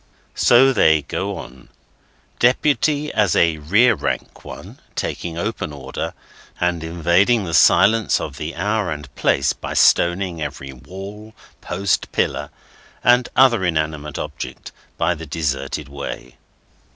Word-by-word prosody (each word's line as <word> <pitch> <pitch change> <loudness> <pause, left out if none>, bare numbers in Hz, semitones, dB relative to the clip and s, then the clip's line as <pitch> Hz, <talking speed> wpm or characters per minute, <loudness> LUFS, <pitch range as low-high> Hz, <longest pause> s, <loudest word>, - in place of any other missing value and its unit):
So 130 +3 +5
they 80 - +4
go 95 +6 -4
on; 65 -2 -11 0.7
Deputy, 145 +4 +2
as 100 -5 +2
a 85 -2 +3
rear 105 +11 +4
rank - - -4
one, - - -11 0.2
taking 85 -1 -4
open 85 -4 -3
order, 65 -2 -6 0.4
and 90 -2 0
invading 85 +7 +2
the 85 -3 -5
silence 110 +5 +4
of - - -6
the 75 +2 -5
hour 105 +1 -1
and 75 -1 -7
place - - +1
by - - -7
stoning 85 -1 +3
every 70 -2 -6
wall, 95 - -10 0.3
post, 100 -2 -1
pillar, - - -1 0.5
and 125 0 +4
other 120 -6 +5
inanimate 75 -3 -2
object, 70 -3 -7 0.3
by 85 +1 +1
the 80 -1 -9
deserted 70 -1 -3
way. 70 0 -8
85 Hz, 125 wpm, -20 LUFS, 75-105 Hz, 0.7 s, So